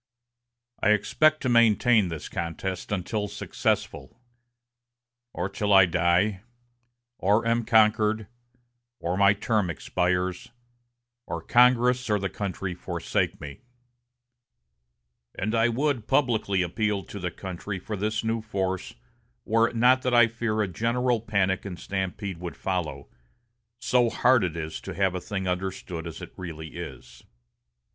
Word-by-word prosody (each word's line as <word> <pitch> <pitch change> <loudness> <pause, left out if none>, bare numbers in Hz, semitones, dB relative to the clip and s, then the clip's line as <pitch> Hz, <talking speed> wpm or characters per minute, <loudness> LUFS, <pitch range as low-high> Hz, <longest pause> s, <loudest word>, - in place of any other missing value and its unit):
I 105 - +4
expect 155 +9 +2
to - - 0
maintain 115 -2 +4
this 80 -3 -6
contest 90 +3 -4
until 105 +2 -2
successful, 115 - -3 1.1
or 90 - -3
till 100 +1 -2
I 95 -1 +8
die, 90 +3 +1 0.8
or 105 +4 +2
am 115 0 +2
conquered, 110 -1 +3 0.7
or 85 +2 -2
my 100 +1 +5
term 105 -2 0
expires, 90 +2 -1 0.8
or - - -3
Congress 125 0 +3
or 105 - +3
the 95 -1 -3
country 95 -2 -4
forsake 90 - -2
me; 70 -1 -9 1.7
and 105 +4 -2
I 115 +1 +3
would 130 -2 -1
publicly 110 -9 +2
appeal 105 +2 -1
to 100 - -9
the 90 -1 -2
country 95 +2 -6
for 105 +4 -5
this 105 +2 -2
new 115 0 -1
force 95 -4 -3 0.5
were 115 +1 +3
it - - -12
not 125 +3 +4
that 125 -1 +1
I 120 -1 +8
fear 115 -1 -1
a - - -2
general 115 +4 0
panic 100 -4 0
and 95 -3 -6
stampede 95 -1 -4
would 90 -1 -7
follow, 80 -7 -3 0.7
so 120 0 +2
hard 125 -1 +3
it 85 -2 -2
is 80 -1 -5
to 95 - -7
have 95 -1 +1
a 90 - -4
thing 95 -1 -4
understood 90 -2 -4
as 85 - -8
it - - -10
really 80 -3 -7
is." 65 -7 -9
100 Hz, 135 wpm, -26 LUFS, 90-115 Hz, 1.7 s, I